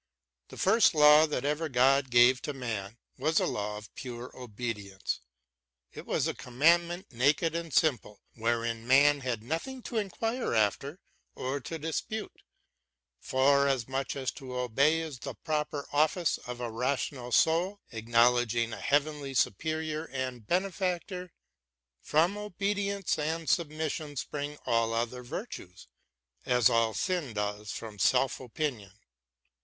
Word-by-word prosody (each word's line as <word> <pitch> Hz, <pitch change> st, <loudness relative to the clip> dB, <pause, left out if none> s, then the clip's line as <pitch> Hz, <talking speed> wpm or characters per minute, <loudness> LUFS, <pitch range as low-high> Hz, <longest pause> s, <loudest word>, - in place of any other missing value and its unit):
The -, -, -12 dB
first 200 Hz, -2 st, +4 dB
law 150 Hz, +1 st, +7 dB
that 140 Hz, -3 st, -2 dB
ever 150 Hz, +2 st, -1 dB
God 135 Hz, +1 st, +3 dB
gave 120 Hz, +1 st, +5 dB
to 145 Hz, -, -4 dB
man 115 Hz, -5 st, -5 dB, 0.2 s
was 155 Hz, +4 st, +2 dB
a -, -, +1 dB
law 105 Hz, 0 st, -3 dB
of 105 Hz, 0 st, -12 dB
pure 125 Hz, -1 st, -8 dB
obedience; 105 Hz, -5 st, -5 dB, 0.7 s
it -, -, -10 dB
was -, -, +1 dB
a -, -, -1 dB
commandment 170 Hz, +7 st, +1 dB
naked 145 Hz, +6 st, +2 dB
and 165 Hz, -1 st, -4 dB
simple 130 Hz, -8 st, +1 dB
wherein 115 Hz, 0 st, -1 dB
man 145 Hz, +2 st, +5 dB
had 125 Hz, -5 st, -3 dB
nothing 200 Hz, -, -4 dB
to 235 Hz, -, -4 dB
inquire 225 Hz, -, -1 dB
after 135 Hz, -, 0 dB, 0.4 s
or 135 Hz, +2 st, -3 dB
to 160 Hz, +6 st, -6 dB
dispute, 160 Hz, +8 st, -4 dB, 0.8 s
forasmuch 135 Hz, -1 st, +1 dB
as 135 Hz, -2 st, -2 dB
to 130 Hz, -3 st, -8 dB
obey 140 Hz, +6 st, +2 dB
is 155 Hz, -6 st, -6 dB
the -, -, -6 dB
proper 150 Hz, -2 st, -3 dB
office 155 Hz, +3 st, +2 dB
of 125 Hz, 0 st, -6 dB
a 120 Hz, -2 st, -3 dB
rational 125 Hz, +1 st, -2 dB
soul 165 Hz, +9 st, +3 dB
acknowledging 115 Hz, 0 st, +2 dB
a -, -, -7 dB
heavenly 145 Hz, -1 st, 0 dB
superior 155 Hz, -, -1 dB
and 130 Hz, -6 st, -5 dB
benefactor. 180 Hz, -1 st, -2 dB, 0.7 s
From 170 Hz, +7 st, +2 dB
obedience 200 Hz, -2 st, -1 dB
and 160 Hz, +2 st, -2 dB
sub 165 Hz, +5 st, +2 dB
mission 155 Hz, -1 st, -4 dB
spring 145 Hz, +2 st, -4 dB
all 115 Hz, 0 st, +1 dB
other 120 Hz, +2 st, -2 dB
virtues, 120 Hz, -, -8 dB, 0.6 s
as 125 Hz, -3 st, +4 dB
all 115 Hz, -2 st, +2 dB
sin 175 Hz, -, -1 dB
does 105 Hz, 0 st, -3 dB
from 110 Hz, -3 st, -7 dB
self 130 Hz, +7 st, +2 dB
opinion. 125 Hz, -6 st, -4 dB
140 Hz, 135 wpm, -29 LUFS, 120-160 Hz, 0.8 s, law